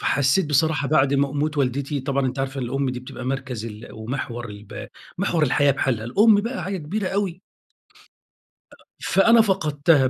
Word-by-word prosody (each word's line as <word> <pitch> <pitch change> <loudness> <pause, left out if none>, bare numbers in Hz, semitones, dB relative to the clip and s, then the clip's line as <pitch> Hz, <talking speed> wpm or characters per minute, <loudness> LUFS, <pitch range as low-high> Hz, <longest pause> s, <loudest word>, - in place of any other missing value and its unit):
فحسيت 145 +5 +2
بصراحة 150 0 +1
بعد 140 -2 +3
ما 140 0 +2
موت 150 +1 -1
والدتي، 140 +2 -1
طبعًا 135 0 0
أنتِ 130 +1 -4
عارفة 135 0 -2
الأم 130 +2 -1
دي 125 - -5
بتبقى 130 0 -9
مركَز 130 -4 -3
ال 105 0 -9
ومحور 120 +1 -5
الـب 105 0 -9 0.3
محور 175 -5 +1
الحياة 145 0 +3
بحالها، 125 -5 0
الأم 205 - +5
بقى 240 +4 -4
حاجة 195 +1 -3
كبيرة 185 +6 -3
أوي. 190 -3 -2 1.6
فأنا 230 +4 +5
فقدْتها، 155 -8 +2
140 Hz, 155 wpm, -23 LUFS, 130-165 Hz, 1.6 s, الأم